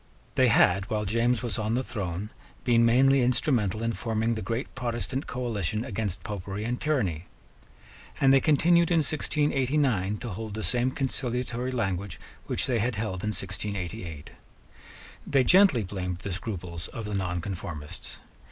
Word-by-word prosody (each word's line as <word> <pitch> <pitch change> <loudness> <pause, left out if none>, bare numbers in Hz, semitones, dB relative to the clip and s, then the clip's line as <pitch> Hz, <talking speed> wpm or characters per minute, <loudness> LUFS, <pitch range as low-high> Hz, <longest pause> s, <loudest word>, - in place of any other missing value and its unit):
They 130 - +4
had, 100 -3 +4
while 105 -1 -1
James 115 +4 +1
was 115 -5 -1
on 110 +1 0
the 130 - 0
throne, 100 -3 -4 0.3
been 115 -2 +4
mainly 135 +3 +5
instrumental 120 -4 +1
in 115 0 0
forming 115 0 -1
the 110 - -3
great 115 +4 -3
Protestant 125 +2 -3
coalition 110 -4 -2
against 100 -4 -3
Popery 100 0 -5
and 120 +2 -2
tyranny; 100 - 0 0.9
and 135 -1 +5
they 135 - +7
continued 170 +4 +4
in 170 -2 +4
1689 135 -9 +1
to 120 +2 -6
hold 105 +1 -5
the 110 - -4
same 125 +1 +2
conciliatory 125 -2 -1
language 100 -6 -2 0.3
which - - 0
they 120 -3 +1
had 120 +2 0
held 100 -4 -3
in 105 - 0
1688. 95 -6 -4 1.0
They 135 -2 +4
gently 185 - +5
blamed 90 -2 -4
the 95 +1 -5
scruples 90 -4 -4
of 115 - -7
the 105 - -4
nonconformists. 90 -4 -4
115 Hz, 150 wpm, -27 LUFS, 100-125 Hz, 1.0 s, they